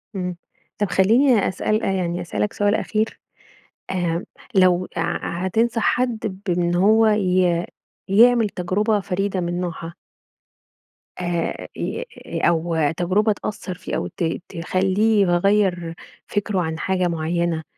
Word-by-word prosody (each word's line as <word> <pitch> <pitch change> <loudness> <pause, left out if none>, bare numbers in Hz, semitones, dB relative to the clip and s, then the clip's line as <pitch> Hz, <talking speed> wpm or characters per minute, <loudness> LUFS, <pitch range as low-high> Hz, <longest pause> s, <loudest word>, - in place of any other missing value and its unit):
امم، 180 -2 -3 0.4
طب 205 -2 0
خلّيني 230 +3 +4
أسأل 215 +3 -1
يعني 180 -2 -1
أسألك 195 +4 -2
سؤال 205 +1 +2
أخير. 220 0 -1 0.7
آمم، 175 -2 -1 0.3
لو 185 -1 +4
ع - - +1
ع 175 +2 -2
هتنصح 225 +4 +1
حد 220 -6 0
بإن 175 0 +1
هو 220 +5 +5
ي 180 -4 +2 0.4
يعمل 230 +2 +5
تجربة 205 +4 0
فريدة 195 +1 -2
من 175 +1 -2
نوعها. 170 -1 -5 1.3
آآ 175 -2 -2
ي 485 - -3 0.2
ي - - -4
أو 170 0 +1 0.2
تجربة 195 +5 +2
تأثر 200 -3 -5
فيه 180 - -5
أو - - -2
ت 175 - -5 0.3
تخلّيه 190 +5 +1
يغير 180 -2 +2 0.3
فكره 205 -2 -1
عن 160 0 -3
حاجة 185 -1 0
معينة، 170 0 -1
185 Hz, 125 wpm, -22 LUFS, 175-210 Hz, 1.3 s, هو